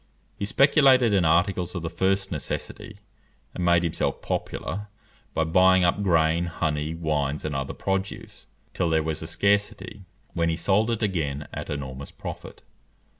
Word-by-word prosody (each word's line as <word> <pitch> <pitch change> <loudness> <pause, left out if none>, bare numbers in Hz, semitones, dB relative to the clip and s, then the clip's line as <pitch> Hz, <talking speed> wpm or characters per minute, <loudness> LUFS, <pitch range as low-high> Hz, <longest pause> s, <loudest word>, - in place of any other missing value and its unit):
He 100 - -1
speculated 130 -1 +5
in 95 -4 +3
articles 90 +2 +1
of 90 - -4
the 85 - -2
first 95 0 0
necessity, 105 - -5 0.6
and 90 - -4
made 85 0 +4
himself 85 -2 -1
popular 105 +2 -4 0.5
by 80 - +2
buying 95 +3 +4
up 90 +3 +2
grain, 85 -2 +2
honey, 75 -1 -2
wines, 75 -3 -1
and 75 -2 -3
other 70 0 -3
produce, 95 0 -4 0.3
till 90 -2 0
there 80 -1 +2
was 80 0 -3
a 80 - -6
scarcity, 100 +4 0 0.3
when 85 -1 +1
he 80 - 0
sold 100 +6 +1
it 115 -1 -1
again 75 -7 -2
at - - -6
enormous 70 -1 -5
profit. - - -9
85 Hz, 155 wpm, -25 LUFS, 80-100 Hz, 0.6 s, speculated